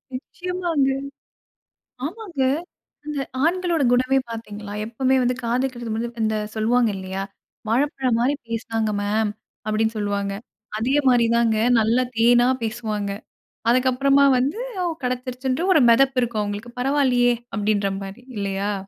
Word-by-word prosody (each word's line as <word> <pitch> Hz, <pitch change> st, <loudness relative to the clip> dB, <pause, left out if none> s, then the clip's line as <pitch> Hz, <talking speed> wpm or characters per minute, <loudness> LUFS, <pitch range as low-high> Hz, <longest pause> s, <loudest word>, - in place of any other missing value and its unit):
நிச்சியமாங்க. 345 Hz, -1 st, -1 dB, 1.2 s
ஆமாங்க. 355 Hz, -3 st, -5 dB, 0.6 s
அந்த 300 Hz, -1 st, -4 dB, 0.3 s
ஆண்களோட 345 Hz, -2 st, +1 dB
குணமே 255 Hz, +2 st, +3 dB
பாத்தீங்களா? 210 Hz, -2 st, -7 dB
எப்பவுமே 260 Hz, +4 st, +1 dB
வந்து 250 Hz, 0 st, +1 dB
காதலிக்கிறதுக்கு 240 Hz, -1 st, -1 dB
முன்ன 235 Hz, +1 st, -4 dB
இந்த 220 Hz, 0 st, 0 dB, 0.2 s
சொல்வாங்க 230 Hz, +1 st, +2 dB
இல்லையா? 190 Hz, 0 st, -4 dB, 0.5 s
"வாழைப்பழம் 260 Hz, 0 st, +1 dB
மாரி 270 Hz, +4 st, +2 dB
பேசினாங்க 225 Hz, -1 st, -2 dB
மேம்" 210 Hz, +1 st, +1 dB, 0.4 s
அப்டின்னு 220 Hz, +1 st, 0 dB
சொல்வாங்க. 200 Hz, -1 st, -1 dB, 0.5 s
அதே 245 Hz, +5 st, 0 dB
மாரி 240 Hz, -2 st, +4 dB
தாங்க. 230 Hz, -2 st, +2 dB, 0.2 s
நல்லா 230 Hz, +4 st, +2 dB
தேனா 240 Hz, +2 st, +5 dB
பேசுவாங்க. 215 Hz, -3 st, -3 dB, 0.6 s
அதுக்கு 255 Hz, +2 st, +4 dB
அப்புறமா 275 Hz, +2 st, +4 dB
வந்து, 280 Hz, -, 0 dB, 0.2 s
அவ் 345 Hz, -2 st, 0 dB
கெடச்சிருச்சுன்ட்டு 255 Hz, +3 st, -2 dB
வந்து 385 Hz, -, +2 dB
ஒரு 300 Hz, -, +5 dB
மெதப்பு 270 Hz, +2 st, +4 dB
இருக்கும்! 230 Hz, -3 st, -1 dB
அவுங்களுக்கு. 205 Hz, +4 st, -6 dB
"பரவாயில்லையே" 255 Hz, -3 st, +3 dB, 0.2 s
அப்டடீன்ற 205 Hz, -1 st, +1 dB
மாரி 195 Hz, +5 st, -9 dB, 0.2 s
இல்லையா? 200 Hz, +1 st, -1 dB
240 Hz, 125 wpm, -23 LUFS, 220-270 Hz, 1.2 s, தேனா